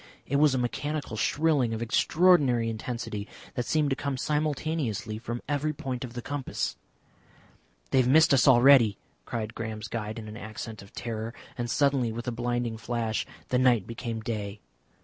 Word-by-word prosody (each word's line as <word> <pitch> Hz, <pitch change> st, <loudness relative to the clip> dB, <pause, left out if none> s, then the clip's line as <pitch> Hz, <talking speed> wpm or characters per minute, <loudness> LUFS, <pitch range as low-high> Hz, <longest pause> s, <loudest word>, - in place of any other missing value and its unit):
It 140 Hz, -, 0 dB
was 145 Hz, -2 st, +5 dB
a -, -, +1 dB
mechanical 140 Hz, +1 st, -2 dB
shrilling 140 Hz, -1 st, +2 dB
of 110 Hz, -, -5 dB
extraordinary 130 Hz, -3 st, +3 dB
intensity 110 Hz, -2 st, -4 dB, 0.3 s
that 125 Hz, -, -3 dB
seemed 150 Hz, -2 st, +2 dB
to -, -, +2 dB
come 140 Hz, -1 st, -3 dB
simultaneously 150 Hz, -, -1 dB
from 120 Hz, +1 st, -5 dB
every 150 Hz, +1 st, 0 dB
point 130 Hz, -3 st, -4 dB
of 120 Hz, -2 st, -7 dB
the 120 Hz, -1 st, -6 dB
compass. 145 Hz, -2 st, -3 dB, 1.2 s
"They -, -, +4 dB
have 125 Hz, -, +3 dB
missed 155 Hz, +3 st, +6 dB
us 135 Hz, -1 st, +5 dB
already!" 125 Hz, -4 st, +7 dB, 0.3 s
cried 110 Hz, -1 st, -4 dB
Graham's 110 Hz, -1 st, -5 dB
guide 110 Hz, -1 st, -4 dB
in 110 Hz, -1 st, -7 dB
an 105 Hz, +1 st, -8 dB
accent 110 Hz, -1 st, -7 dB
of 100 Hz, -, -14 dB
terror, 115 Hz, 0 st, -5 dB, 0.2 s
and 120 Hz, -1 st, -3 dB
suddenly, 140 Hz, -4 st, +2 dB
with 120 Hz, +2 st, -6 dB
a -, -, 0 dB
blinding 120 Hz, -1 st, -2 dB
flash, 115 Hz, -1 st, -2 dB, 0.2 s
the 125 Hz, -, +2 dB
night 120 Hz, -6 st, +4 dB
became 115 Hz, -1 st, -5 dB
day. 105 Hz, -2 st, -4 dB
120 Hz, 170 wpm, -28 LUFS, 110-140 Hz, 1.2 s, already